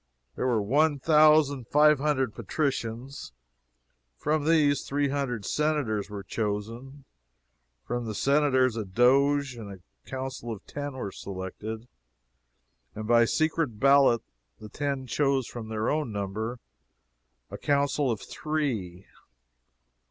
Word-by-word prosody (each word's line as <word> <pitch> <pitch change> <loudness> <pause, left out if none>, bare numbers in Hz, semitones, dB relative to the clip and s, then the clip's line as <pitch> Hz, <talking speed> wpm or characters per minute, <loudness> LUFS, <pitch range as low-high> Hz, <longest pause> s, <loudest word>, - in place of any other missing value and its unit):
There 130 - -1
were 115 -4 +1
one 145 +7 +2
thousand 150 -3 +4
five 150 +1 +5
hundred 135 -5 0
Patricians; 130 - -3 0.8
from 150 - 0
these, 150 -3 +3
three 145 0 -1
hundred 130 -7 -2
Senators 145 -10 0
were 100 -1 -6
chosen; 115 +7 -4 0.8
from 120 -1 -3
the 110 - -4
Senators 135 -2 +2
a 110 - -2
Doge 135 +6 +2
and 110 -4 -8
a 95 -2 -16
Council 130 -3 -5
of 105 -3 -8
Ten 145 -1 -5
were 125 -7 -5
selected, 100 +5 -7 1.1
and 110 - -5
by 115 0 +5
secret 155 -5 0
ballot 135 -3 +5 0.4
the 110 - -10
Ten 140 +2 -3
chose 135 +1 +1
from 115 -2 -8
their 110 0 -2
own 150 -6 0
number 105 +4 -3 0.9
a - - -6
Council 140 -1 +1
of 110 -4 -2
Three. 115 - -3
130 Hz, 120 wpm, -27 LUFS, 110-145 Hz, 1.1 s, five